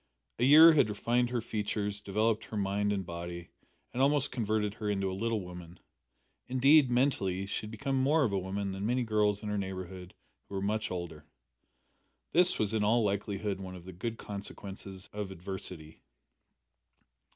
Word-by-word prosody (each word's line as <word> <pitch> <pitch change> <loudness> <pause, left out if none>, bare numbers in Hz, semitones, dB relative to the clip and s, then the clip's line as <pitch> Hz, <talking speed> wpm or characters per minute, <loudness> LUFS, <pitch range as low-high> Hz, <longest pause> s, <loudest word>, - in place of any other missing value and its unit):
A 120 - +3
year 160 +4 +9
had 140 -8 +4
refined 120 +4 +1
her 120 -1 -1
features, 105 -2 -3
developed 110 +2 0
her 110 - -6
mind 100 +1 0
and 95 -2 -2
body, 85 0 -6 0.4
and 125 - -1
almost 145 0 +3
converted 110 -4 -1
her 105 -1 -4
into 95 -2 0
a - - -4
little 110 +2 -1
woman. 90 -1 -10 0.7
Indeed, 135 +2 +5
mentally, 110 -7 +1
she 105 +2 -3
had - - -8
become 135 +5 -2
more 150 +3 +3
of 110 -7 0
a 100 - +1
woman 95 +1 -3
than 95 +1 -5
many 125 +4 +1
girls 105 -2 +1
in 105 - -3
her 105 -1 -1
neighbourhood 95 -1 -6 0.3
who 100 - -6
were 95 - -2
much 110 +2 -1
older. 85 -5 -6 1.1
This 180 +2 +5
was 110 0 0
in 110 -2 +1
all 115 +3 +3
likelihood 100 0 -2
one 95 -1 -7
of 90 -1 -11
the 95 - -9
good 115 +6 -4
consequences 100 -2 -7
of 105 -2 -4
adversity. 90 -4 -7
105 Hz, 175 wpm, -31 LUFS, 95-115 Hz, 1.1 s, year